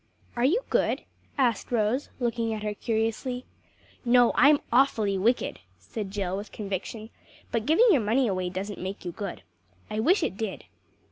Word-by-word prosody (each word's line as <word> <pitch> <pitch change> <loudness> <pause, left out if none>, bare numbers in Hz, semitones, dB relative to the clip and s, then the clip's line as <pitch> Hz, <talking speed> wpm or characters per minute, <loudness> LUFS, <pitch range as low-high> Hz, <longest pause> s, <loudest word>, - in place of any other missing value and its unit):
"Are 240 - 0
you 345 - +3
good?" - - +1 0.3
asked 245 -6 +1
Rose 235 +4 +1
looking 230 -2 0
at 215 - -6
her 210 -1 -1
curiously. 225 +4 -2 0.6
"No, 245 -1 +5
I'm 290 0 +6
awfully 225 -6 +3
wicked," 225 +6 +1 0.2
said 215 -4 -6
Jill 190 -2 -2
with 205 +2 -6
conviction, 210 +2 -5 0.4
"but 230 0 -1
giving 330 +11 +5
your 285 -9 +4
money 230 +5 +2
away 185 -4 -1
doesn't 195 +2 -5
make 190 +1 -5
you 175 - -3
good. 180 - -6 0.5
I 215 - -2
wish 340 - +3
it 190 - -2
did." 215 -3 -4
225 Hz, 160 wpm, -27 LUFS, 200-250 Hz, 0.6 s, I'm